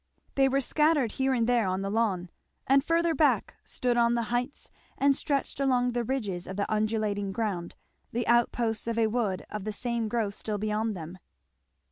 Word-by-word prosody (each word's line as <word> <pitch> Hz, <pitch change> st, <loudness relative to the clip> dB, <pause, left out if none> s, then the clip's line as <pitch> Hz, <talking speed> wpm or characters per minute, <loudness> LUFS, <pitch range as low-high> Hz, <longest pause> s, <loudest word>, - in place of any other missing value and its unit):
They 270 Hz, -1 st, +3 dB
were 275 Hz, +1 st, +2 dB
scattered 300 Hz, -3 st, +2 dB
here 265 Hz, 0 st, 0 dB
and 235 Hz, -3 st, +1 dB
there 240 Hz, -4 st, +3 dB
on 185 Hz, +1 st, -1 dB
the 195 Hz, -, -2 dB
lawn, 200 Hz, -6 st, 0 dB, 0.3 s
and 270 Hz, +1 st, +4 dB
further 335 Hz, +1 st, +2 dB
back 280 Hz, -10 st, +2 dB
stood 245 Hz, -1 st, -1 dB
on 235 Hz, 0 st, +4 dB
the 235 Hz, -, 0 dB
heights 250 Hz, +4 st, -3 dB, 0.3 s
and 275 Hz, 0 st, +4 dB
stretched 280 Hz, -1 st, -2 dB
along 250 Hz, -2 st, +2 dB
the 240 Hz, 0 st, -1 dB
ridges 210 Hz, -8 st, -3 dB
of 190 Hz, -, -5 dB
the 200 Hz, 0 st, 0 dB
undulating 210 Hz, -2 st, 0 dB
ground, 190 Hz, -5 st, -3 dB, 0.4 s
the 240 Hz, 0 st, -1 dB
outposts 235 Hz, -1 st, +1 dB
of 230 Hz, 0 st, -1 dB
a 225 Hz, -, +4 dB
wood 215 Hz, -5 st, -1 dB
of 210 Hz, -2 st, -4 dB
the 215 Hz, -, -3 dB
same 235 Hz, +1 st, -2 dB
growth 215 Hz, -2 st, -1 dB
still 210 Hz, +1 st, -4 dB
beyond 215 Hz, 0 st, -1 dB
them. 170 Hz, +3 st, -8 dB
230 Hz, 185 wpm, -28 LUFS, 205-255 Hz, 0.4 s, and